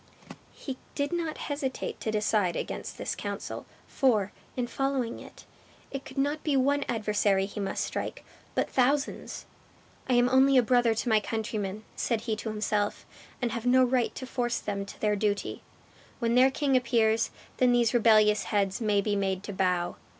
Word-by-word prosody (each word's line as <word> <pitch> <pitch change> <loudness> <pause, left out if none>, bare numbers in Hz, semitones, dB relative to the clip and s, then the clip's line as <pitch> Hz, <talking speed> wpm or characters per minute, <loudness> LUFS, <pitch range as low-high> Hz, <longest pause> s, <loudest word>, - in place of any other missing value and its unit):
He 265 -3 -6 0.2
did 285 +4 -1
not 330 -3 -2
hesitate 285 -3 -4
to - - -2
decide 210 -4 +1
against - - -5
this - - -3
counsel, - - -5 0.2
for, 215 -8 +2 0.3
in 250 - 0
following 265 -1 -1
it, - - -13 0.5
it 275 0 -5
could 265 - -11
not 290 +3 0
be 290 -3 +2
one 280 +2 +2
adversary 210 -4 +1
he 205 +2 -7
must 195 -1 -1
strike, - - -5 0.3
but - - +1
thousands. 275 +3 0 0.6
"I - - +3
am 245 0 +5
only 265 +1 +5
a 250 - +6
brother 240 -1 +3
to 225 - -2
my 220 -1 +5
countrymen," 215 -1 -3
said 230 -3 -1
he 225 -1 -1
to 220 - -4
himself, 210 -1 -1 0.4
"and 240 - +1
have 235 +1 -3
no 255 +1 +6
right 250 -1 +1
to 260 - -5
force 245 -2 -1
them 200 -1 -4
to - - -11
their 210 -1 +2
duty. 205 0 -1 0.6
When 235 -1 0
their 255 +2 +6
king 275 0 +1
appears, 230 -3 +2 0.3
then 250 -1 +4
these 240 -1 +3
rebellious 215 -3 +5
heads 200 0 0
may 210 -2 +2
be 205 0 0
made 195 -1 -1
to 205 - -6
bow." 180 -2 0
230 Hz, 175 wpm, -28 LUFS, 210-260 Hz, 0.6 s, a